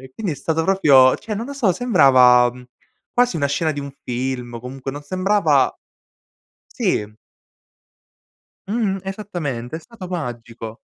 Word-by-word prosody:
E 130 0 -13
quindi 200 -7 -3
è - - -4
stato 160 +2 -1
proprio 140 -9 +5
cioè 215 0 -6
non 220 - -4
lo 280 - -6
so, 255 -9 +1
sembrava, 130 - +5
mhmm, 125 +1 -13 0.5
quasi 245 -6 +2
una 140 -2 +1
scena 155 +2 0
di 145 - -5
un 140 0 -7 0.2
film, 125 -1 -3
o 115 - -6
comunque 130 +2 -6
non 145 +2 -8
sembrava 185 -4 +2 1.0
Sì. 105 0 -1 1.5
Mh-mh, 205 -2 -1
esattamente, 170 - -5
è - - -5
stato 195 +2 -11
magico. 120 -8 -6
145 Hz, 150 wpm, -20 LUFS, 125-195 Hz, 1.5 s, proprio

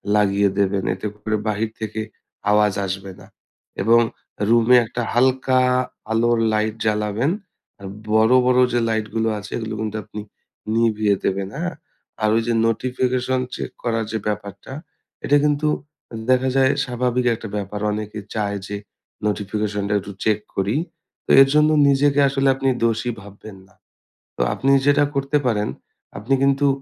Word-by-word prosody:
লাগিয়ে 100 -1 +3
দেবেন। 100 -1 +1
এতে 95 +3 -5
করে 110 +1 -2
বাহির 110 +1 -1
থেকে 110 0 -4 0.5
আওয়াজ 105 -1 +3
আসবে 95 +1 -5
না। - - -14 0.6
এবং 115 +3 +5 0.5
রুমে 120 +2 +5
একটা 120 +2 -4
হালকা 130 +1 +3 0.5
আলোর 115 +1 +2
লাইট 110 0 0
জ্বালাবেন 105 +6 0 0.5
আর 100 - -8 0.2
বড়, 110 +2 +4
বড় 125 0 +4
যে 120 - +3
লাইটগুলো 110 0 -1
আছে 105 - -10
এগুলো 110 -1 -4
কিন্তু 110 0 -3
আপনি 105 0 -7 0.5
নিভিয়ে 110 -3 +2
দেবেন, 95 0 -1
হ্যাঁ? 175 +3 -3 0.5
আর 110 - +4
ওই 115 - +3
যে 120 - +1
notification 125 +2 0 0.2
চেক - - -5
করার 115 -2 0
যে 110 - -1
ব্যাপারটা, 105 +3 -5 0.5
এটা 145 - +4
কিন্তু 150 +1 +1 0.5
উম 110 - -5
দেখা 130 +1 +3
যায় 130 0 +4
স্বাভাবিক 125 0 -1
একটা 110 - -8
ব্যাপার। 105 0 -4
অনেকে 105 0 -4 0.2
চায় 100 -2 -1
যে 105 - -4 0.5
notification 105 0 -2
টা - - +1
একটু 100 +1 -9
চেক 105 -1 +2 0.2
করি। 100 +4 0 0.5
তো - - -1
এর 135 - +7
জন্য 150 0 +5 0.2
নিজেকে 140 +1 +3
আসলে 135 0 0
আপনি 135 0 -2 0.2
দোষী 115 +1 0
ভাববেন 100 0 -12
না। - - -27 0.6
তো - - -1
আপনি 135 - -1 0.2
যেটা 145 0 +5
করতে 140 +2 +1
পারেন, 105 -3 0 0.5
আপনি 110 +7 -1
কিন্তু 140 +1 +3
110 Hz, 150 wpm, -21 LUFS, 105-125 Hz, 0.6 s, এর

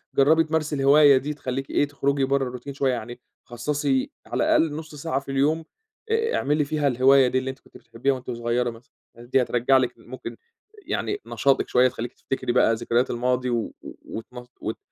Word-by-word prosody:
جرّبي 155 +4 +5
تمارسي 155 -1 -1
الهواية 140 0 +6
دي، 145 +3 -3
تخليكِ 135 -1 -4
إيه، 145 - +1
تخرجي 140 -1 0
برّا 135 0 +1
الروتين 125 +3 -7
شوية، 135 -1 +1
يعني 120 +1 -6 0.3
خصصي 135 +2 -1 0.2
على - - -1
الأقل 160 -2 +2
نُص 155 -1 -8
ساعة 145 -2 -2
في 140 0 -8
اليوم 150 +4 +1 0.5
آآ، 450 0 +1
اعملي 150 +1 +1
فيها 150 0 0
الهواية 135 +1 +5
دي 125 - 0
اللي 130 0 -1
أنتِ 130 0 -7
كنتِ - - -17
بتحبيها 120 +4 -2
وأنتِ 125 -1 -6
صغيّرة 120 +1 -1
مثلًا، 115 +1 -13 0.2
الحاجات 120 +1 -14
دي 135 0 +4
هترجع 125 +2 +2
لِك 130 - -1
ال - - -19
ممكن - - -8 0.5
يعني 410 0 -2
نشاطِك 135 -1 +1
شوية، 125 +1 +4
تخليكِ 120 -1 -5
تفتكري 135 - -3
بقى 120 -2 +4
ذكريات 120 +2 0
الماضي 125 +1 0
و 120 -2 -2
و - - -9
وت 110 - -7
مص 125 -1 -10
وت 110 - -4
135 Hz, 195 wpm, -24 LUFS, 125-145 Hz, 0.5 s, الهواية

